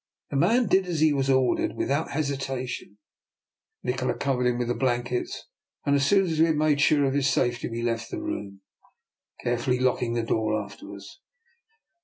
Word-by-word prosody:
The - - -3
man 225 - +3
did 190 -1 +2
as 170 -3 -2
he 155 -1 +4
was 135 -1 0
ordered 130 -2 +2
without 145 +4 -1
hesitation. 135 -7 -3 0.9
Nikola 125 0 -1
covered 125 -3 0
him 120 -1 +1
with 120 -1 -1
the 120 - +1
blankets, 120 -1 -2 0.4
and 140 - +3
as 140 0 +2
soon 195 +2 +4
as 160 -3 -2
we 165 - +6
had 160 - +1
made 150 -1 +2
sure 145 -1 +4
of 135 - 0
his 140 -1 +2
safety 120 -3 0
we 115 0 -4
left 115 -1 -2
the - - -4
room, 100 -1 -5 0.8
carefully 120 +1 0
locking 125 -2 +1
the 115 - 0
door 110 -1 0
after 100 -1 -9
us. 100 - -12
130 Hz, 180 wpm, -26 LUFS, 120-145 Hz, 0.9 s, we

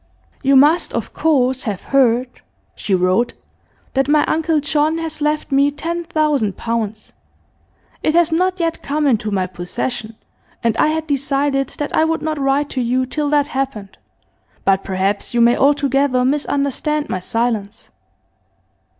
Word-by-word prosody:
'You 275 0 +3
must, 295 +6 +4
of - - -4
course, 260 -5 +1
have 205 -5 -3
heard 250 -2 +1 0.3
[she 195 - -1
wrote] 185 +6 +1 0.6
that 270 0 +1
my 300 0 +3
uncle 320 0 +1
John 300 +2 +1
has 320 -2 -5
left 300 0 -1
me 280 +1 +4
ten 335 +4 -4
thousand 300 - 0
pounds. 220 -2 -4 0.9
It 310 - +1
has 345 -1 +4
not 365 +3 +1
yet 330 -1 -1
come 295 +2 -1
into 220 -6 +1
my 190 -3 0
possession, 200 +5 -5 0.5
and 230 -1 +1
I - - +3
had 315 0 -1
decided 275 -1 0
that 295 - -3
I - - +4
would 325 0 -1
not 310 -1 -2
write 275 +1 0
to 255 - -1
you 250 +2 0
till 295 +3 -2
that 290 -1 +3
happened, 265 -8 -4 0.7
but 195 0 +2
perhaps 195 +4 -2
you - - +3
may 235 +1 +5
altogether 275 -2 +2
misunderstand 285 +2 -1
my 185 - -2
silence. 220 +1 -3
275 Hz, 150 wpm, -18 LUFS, 235-300 Hz, 0.9 s, may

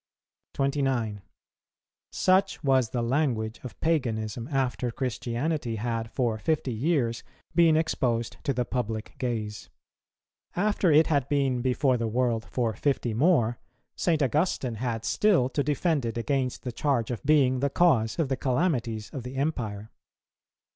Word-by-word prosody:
29. 135 -7 0 0.9
Such 185 -1 +2
was 130 -4 +3
the 120 0 -2
language 115 -4 0
of 125 - -9
paganism 115 -7 -1
after 130 -3 -1
Christianity 125 +2 -2
had 115 +1 -3
for 115 -3 -1
fifty 145 -1 0
years 120 -2 0 0.3
been 165 -2 +5
exposed 120 -7 0
to - - +2
the 125 -2 -1
public 110 -3 -3
gaze; 110 -4 -3 0.9
after 200 -2 +2
it 155 +2 +6
had 140 -4 0
been 135 -4 +1
before 130 +1 +2
the 115 -1 -1
world 115 -1 0
for 120 -3 0
fifty 125 -1 -1
more, 120 -3 +2 0.4
St. 160 -4 +1
Augustine 135 -4 0
had 115 -3 -2
still 185 -12 +3
to 145 +2 0
defend 150 0 0
it 115 0 -3
against 130 +1 -1
the 125 - -3
charge 125 -2 0
of 120 - -4
being 135 -4 +3
the 140 +2 +1
cause 130 -9 +2
of 165 -4 +1
the 135 - 0
calamities 125 -6 -1
of 135 - -5
the 125 +2 -8
Empire. 115 -8 -3
125 Hz, 140 wpm, -27 LUFS, 115-145 Hz, 0.9 s, it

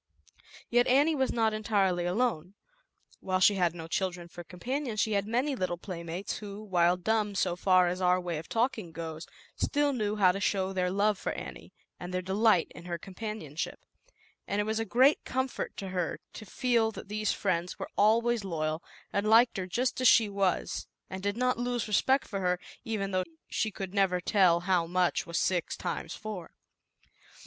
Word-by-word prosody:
Yet 245 +1 +4
Annie 285 +5 +4
was 265 -3 +1
not 225 -2 +1
entirely 195 -5 +1
alone. 190 -3 -1 0.6
While 185 -1 -1
she 195 +3 +6
had 175 -3 +1
no 165 -2 -7
children 180 0 -2
for 175 +1 -9
compan 255 - -4
ions, 215 -3 -3
she 220 - +1
had 200 -1 0
many 255 +5 0
little 185 -6 -2
playmates 175 +1 -5
who, 205 0 -8
while 180 -3 +3
dumb 210 +2 0
so 180 -3 +1
far 185 0 +4
as 180 +2 -2
our 180 0 +3
way 175 -3 -3
of 160 - -11
talking 225 -7 -1
goes, 160 0 -6 0.3
still 290 -1 +1
knew 210 -4 -1
how 190 -3 +5
to 195 - -4
show 195 -1 0
their 180 -1 0
love 200 +2 +1
for - - -2
Annie, - - -8 0.3
and 180 - -6
their 185 0 -2
delight 195 -1 +3
in 170 - -11
her 175 -1 -3
com 190 +3 -12
panionship, 190 -8 -5 0.7
and 200 - -1
it - - +2
was 220 +1 -1
a 225 - -1
great 260 +8 +4
comfort 260 0 -3
to 195 - -5
her 180 -2 -2
to 215 - -9
feel 235 0 +1
that - - -9
these 210 0 -1
friends 180 -2 -1
were - - -6
always 230 +2 +3
loyal 155 -3 -2 0.3
and 200 +1 +1
liked 230 +1 +5
her 185 -1 -3
just 255 +7 -1
as 255 - +5
she 225 -1 +6
was, 195 -3 -1 0.2
and 190 0 -5
did 200 +2 -2
not 250 -1 +1
lose 245 -2 -1
respect 265 +6 +2
for 200 -3 -3
her, 180 -1 0 0.2
even 205 -3 -2
though 185 -1 +1 0.3
she 220 - 0
could 195 -2 -6
never 190 -3 +2
tell 180 -2 +3
how 180 -2 +1
much 180 0 +1
was 170 -1 -2
six 180 -1 0
times 170 -2 -4
four. 210 -6 -7
195 Hz, 190 wpm, -29 LUFS, 180-220 Hz, 0.7 s, she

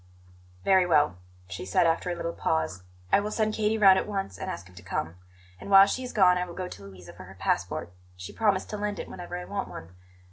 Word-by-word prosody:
"Very 190 -2 +4
well," 150 - +3 0.3
she 85 +1 -6
said, 95 - +2
after 165 +2 +1
a 175 - -2
little 170 0 -4
pause; 80 +4 -1 0.3
"I - - +6
will 205 +1 -3
send 215 0 0
Katie 215 0 +1
round 195 -3 +7
at - - -4
once 195 - -4
and - - -4
ask 85 +2 -6
him 90 - -18
to 90 - -12
come; 85 -2 -3 0.5
and - - -9
while 195 0 +9
she 255 +6 -2
is 250 - -6
gone 180 -3 +4
I 180 - -1
will 170 - -10
go 185 -1 -4
to 100 - -10
Louisa 90 -3 -12
for 95 +1 -12
her 95 +1 -13
passport; 90 -1 -2 0.2
she 90 0 -8
promised 205 -4 0
to 210 - -3
lend 205 -1 -3
it - - -6
whenever 175 0 -7
I 180 - -6
want 200 0 -4
one. 80 - -9
180 Hz, 245 wpm, -27 LUFS, -, 0.5 s, while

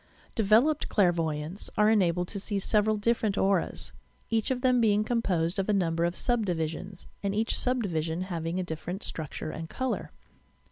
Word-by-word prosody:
Developed 230 +8 +3
clairvoyants 170 -2 0
are 210 - +5
enabled 180 -4 +2
to 200 - -5
see 205 +1 -3
several 210 +2 +2
dif 230 +3 +1
ferent 205 -3 0
auras,— 195 -2 0 0.4
each 225 -1 +1
of 255 -1 -1
them 250 -2 +3
being 210 -2 +3
composed 185 -7 0
of 195 - -1
a - - +4
number 170 -3 +1
of 175 +1 -1
sub 240 -2 0
divisions, 175 +1 -3 0.2
and 200 0 -1
each 225 +2 0
sub 250 -1 +1
division 165 -2 -2
having 170 -1 -3
a - - 0
different 175 +3 -5
structure 155 0 -4
and 160 0 -6
colour. 260 -1 -2
195 Hz, 175 wpm, -28 LUFS, 170-220 Hz, 0.4 s, are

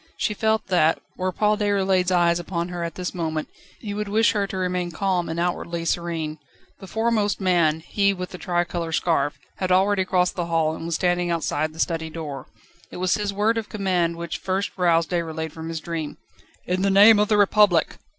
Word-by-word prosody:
She 210 - 0
felt 220 +1 0
that, 165 -3 +3 0.2
were 185 0 -1
Paul 210 +3 +1
Déroulède's 195 -3 +2
eyes 175 -1 +3
upon 170 0 -3
her 175 -1 -4
at 170 -2 -5
this 180 -1 -4
moment, 160 -3 -3 0.3
he 205 -2 -6
would 210 0 -3
wish 220 +3 +3
her 200 -2 0
to 190 - -5
remain 180 -1 -1
calm 180 0 -1
and 165 +1 -3
outwardly 170 -1 -2
serene. 165 -3 -2 0.4
The 195 - -10
foremost 220 -1 0
man 170 -5 +2
he 200 +4 +1
with 180 -2 -5
the 180 - -8
tricolour 175 -2 -2
scarf 160 -4 +1 0.2
had 185 -1 -2
already 190 +1 +3
crossed 180 -1 +1
the 175 -2 -2
hall, 165 -2 +1
and 165 - -6
was 170 - -1
standing 175 0 +1
outside 155 -2 -1
the 160 - -14
study 165 -1 -1
door. 150 -5 -7 0.4
It - - -9
was 180 0 +1
his 205 -1 -1
word 215 +3 +1
of 220 - -8
command 180 -5 0
which 170 -1 -5
first 190 +1 -2
roused 170 -3 +2
Déroulède 160 -2 -2
from 160 +1 -7
his 165 -1 -3
dream: 160 -2 -5 0.5
"In 180 +1 -1
the 200 - +2
name 205 +2 +7
of 210 - +3
the 210 - +2
Republic!" 205 -4 +3
180 Hz, 200 wpm, -23 LUFS, 165-200 Hz, 0.5 s, name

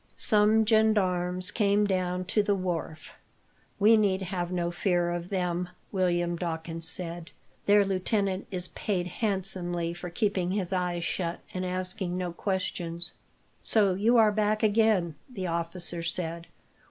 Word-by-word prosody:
Some 215 +1 +4
gendarmes 185 -5 +2
came 205 -1 +2
down 185 -2 -1
to 210 - +2
the 205 0 +1
wharf. 170 -4 -4 0.6
"We 215 +2 +6
need 195 -3 +2
have 180 -1 -3
no 175 -1 -1
fear 175 -1 +1
of 175 +1 -4
them," 180 -2 -1 0.2
William 175 -3 +1
Dawkins 165 -1 -3
said. 170 -1 -5 0.4
"Their 205 0 +6
lieutenant 195 0 -1
is 180 -1 -3
paid 185 -4 -2
handsomely 180 -3 0
for 175 +1 -7
keeping 185 0 0
his 195 -2 -2
eyes 180 -2 -1
shut, 170 -1 -2
and 185 - -3
asking 185 0 -2
no 180 -2 -3
questions." 175 -2 -3 0.5
"So 205 -4 +3
you 220 +6 +3
are 220 -2 +6
back 215 +1 0
again," 210 -5 +3 0.2
the 195 -6 -4
officer 170 0 -3
said. 170 0 -2
185 Hz, 140 wpm, -28 LUFS, 175-200 Hz, 0.6 s, We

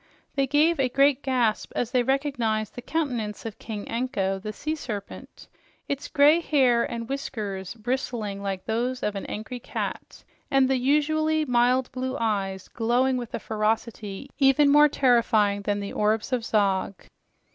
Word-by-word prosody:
They 275 -1 +1
gave 300 +4 +3
a 260 -2 +2
great 275 +1 +3
gasp 250 -6 0
as 245 -1 -1
they 250 -1 +3
recognized 245 -5 -1
the 245 - -7
countenance 245 -9 -3
of 220 -2 -6
King 215 -2 -6
Anko, 230 -6 -1
the 215 +2 -5
sea 305 +8 -3
serpent, 215 -10 -7 0.4
its 280 -1 -3
gray 295 +3 +5
hair 260 -8 +3
and 230 -1 -5
whiskers 210 -8 -4
bristling 225 -3 -3
like 195 -2 -4
those 245 +3 -2
of 210 - 0
an 195 - -5
angry 220 +4 -6
cat, - - -6 0.3
and 270 -1 +4
the 265 0 +2
usually 310 +4 +2
mild 250 0 +2
blue 260 +1 -3
eyes 195 -4 -1
glowing 245 +3 +1
with 240 -3 -4
a - - -3
ferocity 215 +1 -2
even 280 +1 +5
more 295 +1 +7
terrifying 225 -7 +3
than 205 0 -1
the 200 0 -5
orbs 215 +4 0
of 245 -2 0
Zog. 200 -3 +1
245 Hz, 155 wpm, -25 LUFS, 215-270 Hz, 0.4 s, more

